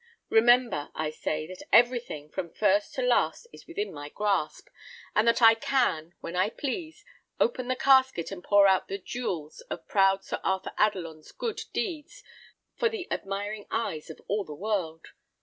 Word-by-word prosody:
Remember, 235 Hz, -8 st, +4 dB
I 155 Hz, -1 st, -2 dB
say, 155 Hz, 0 st, -3 dB
that 185 Hz, +3 st, -10 dB
everything, 240 Hz, -, +3 dB
from 185 Hz, -3 st, -4 dB
first 205 Hz, -1 st, +1 dB
to 260 Hz, -, -1 dB
last, 250 Hz, -, +1 dB
is -, -, -14 dB
within 410 Hz, +5 st, -4 dB
my 145 Hz, 0 st, -8 dB
grasp, 195 Hz, -5 st, -1 dB, 0.5 s
and 215 Hz, +2 st, +3 dB
that 230 Hz, +1 st, +3 dB
I 225 Hz, 0 st, +10 dB
can, 215 Hz, -, 0 dB
when 170 Hz, -, -6 dB
I 185 Hz, +3 st, +2 dB
please, 320 Hz, -, -5 dB, 0.3 s
open 245 Hz, +1 st, +1 dB
the 255 Hz, -, 0 dB
casket, 260 Hz, -10 st, +3 dB
and 185 Hz, -2 st, -7 dB
pour 205 Hz, -1 st, +5 dB
out 190 Hz, -1 st, +3 dB
the 195 Hz, -, -3 dB
jewels 180 Hz, -8 st, -5 dB
of -, -, -6 dB
proud 195 Hz, -1 st, +3 dB
Sir -, -, -4 dB
Arthur 190 Hz, 0 st, -1 dB
Adelon's 170 Hz, -7 st, -1 dB
good 450 Hz, -3 st, -4 dB
deeds 350 Hz, +7 st, -4 dB, 0.5 s
for 460 Hz, -, +2 dB
the 440 Hz, -6 st, -5 dB
admiring 205 Hz, +2 st, -4 dB
eyes 165 Hz, -10 st, -3 dB
of 160 Hz, -, -9 dB
all 205 Hz, +1 st, 0 dB
the 150 Hz, -5 st, -9 dB
world. 180 Hz, -4 st, -3 dB
205 Hz, 165 wpm, -28 LUFS, 175-250 Hz, 0.5 s, I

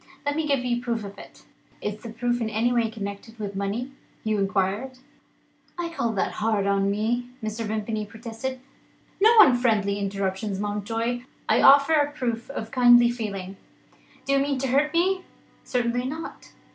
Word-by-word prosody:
Let 285 Hz, 0 st, 0 dB
me 315 Hz, -1 st, -1 dB
give 275 Hz, -3 st, +1 dB
you 240 Hz, -1 st, +1 dB
a -, -, -3 dB
proof 235 Hz, -2 st, -2 dB
of 200 Hz, 0 st, -9 dB
it." -, -, -14 dB, 0.4 s
"Is 210 Hz, 0 st, -4 dB
the 235 Hz, -, -8 dB
proof 240 Hz, +1 st, -1 dB
in 220 Hz, -, -1 dB
any 230 Hz, +3 st, +1 dB
way 235 Hz, -2 st, +2 dB
connected 210 Hz, +1 st, -7 dB
with 205 Hz, -2 st, -5 dB
money?" 205 Hz, +7 st, -3 dB, 0.3 s
Hugh 215 Hz, -1 st, 0 dB
inquired. 200 Hz, +6 st, -1 dB, 0.8 s
"I 345 Hz, -1 st, -2 dB
call 235 Hz, -9 st, -1 dB
that 195 Hz, -, 0 dB
hard 215 Hz, -2 st, 0 dB
on 200 Hz, 0 st, +2 dB
me," 225 Hz, +4 st, -1 dB, 0.2 s
Mr. 220 Hz, +1 st, -3 dB
Vimpany 215 Hz, 0 st, -3 dB
protested. 230 Hz, +4 st, -6 dB, 0.6 s
"No 435 Hz, -, +7 dB
unfriendly 225 Hz, -, +3 dB
interruptions, 195 Hz, 0 st, -2 dB
Mountjoy! 225 Hz, +4 st, -2 dB, 0.3 s
I -, -, +3 dB
offer 280 Hz, +3 st, +7 dB
a 290 Hz, -2 st, +3 dB
proof 235 Hz, -4 st, -3 dB
of 225 Hz, -5 st, -6 dB
kindly 240 Hz, -2 st, +6 dB
feeling. 200 Hz, -5 st, -5 dB, 0.7 s
Do 275 Hz, -, +1 dB
you 275 Hz, -, +4 dB
mean 280 Hz, 0 st, 0 dB
to 270 Hz, -, -1 dB
hurt 290 Hz, +4 st, +2 dB
me?" 370 Hz, +3 st, +2 dB, 0.4 s
"Certainly 245 Hz, 0 st, -1 dB
not. 315 Hz, +4 st, -7 dB
230 Hz, 170 wpm, -25 LUFS, 205-255 Hz, 0.8 s, No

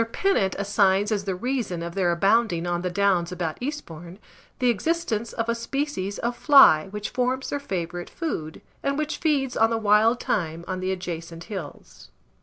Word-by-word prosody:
Pennant 230 Hz, -, +1 dB
assigns 200 Hz, 0 st, +2 dB
as 200 Hz, -2 st, -1 dB
the 190 Hz, -2 st, -1 dB
reason 215 Hz, -5 st, -2 dB
of 170 Hz, 0 st, -5 dB
their 180 Hz, -2 st, +1 dB
abounding 195 Hz, 0 st, +2 dB
on 175 Hz, 0 st, -1 dB
the 180 Hz, -, -2 dB
downs 185 Hz, -2 st, +1 dB
about 170 Hz, -3 st, -3 dB
Eastbourne, 175 Hz, -, -6 dB, 0.4 s
the 250 Hz, -1 st, +3 dB
existence 235 Hz, -, -1 dB
of 230 Hz, -1 st, -3 dB
a 235 Hz, -, +2 dB
species 230 Hz, -4 st, -3 dB
of 240 Hz, +1 st, -2 dB
fly 270 Hz, -, +6 dB
which 210 Hz, +1 st, -5 dB
forms 255 Hz, +1 st, -1 dB
their 285 Hz, -, -1 dB
favourite 175 Hz, -8 st, -4 dB
food, 160 Hz, -, -5 dB, 0.2 s
and 280 Hz, 0 st, -1 dB
which 305 Hz, +1 st, -2 dB
feeds 280 Hz, -5 st, 0 dB
on 225 Hz, 0 st, +4 dB
the 230 Hz, -, 0 dB
wild 220 Hz, +2 st, +4 dB
thyme 170 Hz, -3 st, -2 dB
on 185 Hz, -1 st, -3 dB
the 185 Hz, +1 st, -1 dB
adjacent 170 Hz, -2 st, -5 dB
hills. 140 Hz, -, -9 dB
200 Hz, 175 wpm, -25 LUFS, 175-245 Hz, 0.4 s, fly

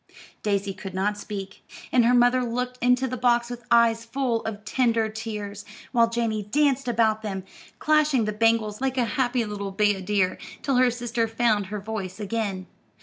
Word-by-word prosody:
Daisy 200 Hz, -1 st, -1 dB
could 190 Hz, -1 st, -8 dB
not 205 Hz, +2 st, 0 dB
speak, 200 Hz, -2 st, -7 dB, 0.3 s
and 245 Hz, -2 st, +4 dB
her 245 Hz, -, +4 dB
mother 245 Hz, +1 st, +4 dB
looked 250 Hz, +1 st, -3 dB
into 250 Hz, +2 st, +3 dB
the 255 Hz, 0 st, -4 dB
box 240 Hz, 0 st, +2 dB
with 240 Hz, 0 st, -7 dB
eyes 230 Hz, -1 st, +4 dB
full 235 Hz, -1 st, -1 dB
of 215 Hz, -1 st, -5 dB
tender 230 Hz, -4 st, +1 dB
tears, 210 Hz, -2 st, -6 dB, 0.3 s
while 235 Hz, -2 st, +4 dB
Janey 230 Hz, -2 st, -1 dB
danced 275 Hz, +5 st, +1 dB
about 220 Hz, -2 st, +2 dB
them, 195 Hz, -3 st, -4 dB, 0.3 s
clashing 305 Hz, -6 st, +3 dB
the 210 Hz, -, -2 dB
bangles 225 Hz, 0 st, +1 dB
like 265 Hz, -1 st, -1 dB
a 245 Hz, -, +3 dB
happy 245 Hz, -2 st, 0 dB
little 200 Hz, -2 st, -5 dB
bayadere, 195 Hz, -1 st, +1 dB, 0.2 s
till 275 Hz, -3 st, +1 dB
her 255 Hz, 0 st, +5 dB
sister 240 Hz, -1 st, -1 dB
found 225 Hz, -3 st, +1 dB
her 210 Hz, +2 st, -4 dB
voice 200 Hz, -2 st, -5 dB
again. 205 Hz, -3 st, -3 dB
225 Hz, 170 wpm, -25 LUFS, 210-245 Hz, 0.3 s, her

